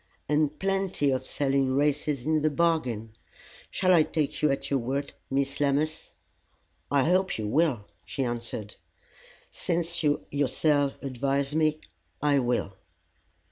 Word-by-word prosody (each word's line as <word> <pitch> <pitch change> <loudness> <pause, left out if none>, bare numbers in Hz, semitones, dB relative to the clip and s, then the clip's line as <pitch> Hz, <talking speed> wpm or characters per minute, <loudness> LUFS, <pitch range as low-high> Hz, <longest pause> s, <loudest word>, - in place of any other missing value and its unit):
'" - - -37
"And 150 0 +1
plenty 195 -7 0
of 130 - -2
selling 135 -2 +1
races 145 -2 0
into 155 0 +2
the 155 +1 +2
bargain. 145 -9 0 0.6
Shall 185 -1 +2
I 170 - +7
take 155 -1 -1
you 150 - +4
at 135 - -2
your 140 - +3
word, 135 +4 -3 0.2
Miss 135 0 -1
Lammas?" 145 - 0 0.7
"I 140 -2 +3
hope 185 +4 +2
you 110 - -3
will," 130 -4 +1 0.2
she 135 - -3
answered. 115 -3 -4 0.7
"Since 170 0 -1
you 150 -2 +1
yourself 145 0 +1
advise 140 +2 -1
me, 155 0 +1 0.4
I 145 -1 +3
will. 120 -5 0
145 Hz, 140 wpm, -27 LUFS, 135-155 Hz, 0.7 s, I